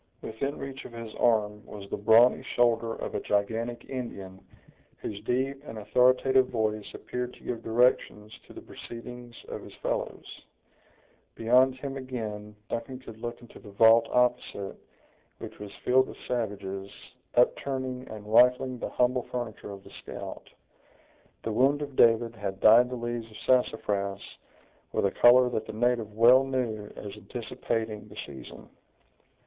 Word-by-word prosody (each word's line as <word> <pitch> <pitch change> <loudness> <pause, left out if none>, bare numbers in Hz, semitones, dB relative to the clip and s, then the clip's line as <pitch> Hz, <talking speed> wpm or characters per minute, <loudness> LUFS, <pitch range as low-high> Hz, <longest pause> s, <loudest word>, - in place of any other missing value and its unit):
Within 135 +6 -3
reach 135 0 -7
of 120 - -10
his 115 -2 -8
arm 105 -3 +1
was 100 -1 -10
the - - 0
brawny 115 +4 +5
shoulder 115 -1 +2
of - - -6
a - - -1
gigantic 115 +4 -1
Indian, 100 -8 -7 0.5
whose 105 -1 -6
deep 135 +3 -1
and 115 - -8
authoritative 130 +4 +3
voice 110 -3 -2
appeared 125 0 -5
to - - -19
give 120 -2 -4
directions 115 -2 +1
to - - -13
the - - -10
proceedings 120 0 -10
of - - -6
his - - -12
fellows. - - -3 1.1
Beyond 125 +3 +4
him 135 +1 -6
again, 110 -5 -6
Duncan 120 +3 -4
could 115 -4 -12
look 120 +1 -6
into 120 - -14
the 105 - -13
vault 115 +3 +6
opposite, 125 -5 0 0.6
which - - -9
was 105 -1 -7 0.2
filled 130 +1 +4
with - - -10
savages, 100 -5 -3 0.5
upturning 130 +1 0
and 105 -1 -9
rifling 125 +3 +4
the - - -4
humble 125 0 +1
furniture 120 -4 -5
of 100 -1 -9
the - - -15
scout. - - -8 0.9
The 115 - -2
wound 135 +6 +3
of 140 -2 -8
David 115 0 +4
had 100 -3 -5
dyed 115 +4 +7
the 125 - -4
leaves 120 -1 -4
of 110 - -12
sassafras 100 -6 +1 0.7
with - - +1
a 100 - +2
color 125 +1 +6
that 110 -3 -3
the - - -6
native 115 -1 0
well 120 +5 +6
knew 120 -6 -2
as 100 -1 -7
anticipating 110 0 -4
the 105 0 -14
season. 70 -2 -11
115 Hz, 150 wpm, -28 LUFS, 105-125 Hz, 1.1 s, dyed